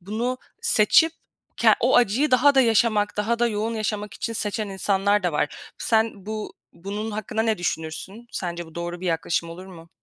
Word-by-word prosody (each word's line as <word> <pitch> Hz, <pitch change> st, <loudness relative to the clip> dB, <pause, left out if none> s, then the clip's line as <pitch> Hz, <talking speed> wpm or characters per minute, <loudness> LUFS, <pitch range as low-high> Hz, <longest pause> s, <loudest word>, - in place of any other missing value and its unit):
bunu 230 Hz, +7 st, -3 dB, 0.2 s
seçip 320 Hz, +10 st, +4 dB, 0.4 s
ke -, -, +5 dB
o -, -, +4 dB
acıyı 245 Hz, +6 st, +3 dB
daha 260 Hz, +3 st, +5 dB
da 270 Hz, -, +6 dB
yaşamak, 225 Hz, -3 st, +2 dB
daha 220 Hz, +3 st, 0 dB
da 240 Hz, -, +3 dB
yoğun 225 Hz, +1 st, -2 dB
yaşamak 210 Hz, -1 st, -3 dB
için 230 Hz, -, -4 dB
seçen 210 Hz, -1 st, -2 dB
insanlar 200 Hz, +1 st, +1 dB
da 180 Hz, -2 st, 0 dB
var. 150 Hz, 0 st, -3 dB
Sen 220 Hz, -3 st, 0 dB
bu, 215 Hz, 0 st, -5 dB, 0.2 s
bunun 205 Hz, +5 st, -5 dB
hakkında 215 Hz, +1 st, -2 dB
ne 225 Hz, -3 st, 0 dB
düşünürsün? 175 Hz, +6 st, -4 dB
Sence 175 Hz, -1 st, -4 dB
bu 160 Hz, -, -16 dB
doğru 175 Hz, 0 st, -5 dB
bir 185 Hz, -, -4 dB
yaklaşım 165 Hz, 0 st, -1 dB
olur 180 Hz, +3 st, -9 dB
mu? 170 Hz, -3 st, -13 dB
210 Hz, 180 wpm, -24 LUFS, 180-225 Hz, 0.4 s, da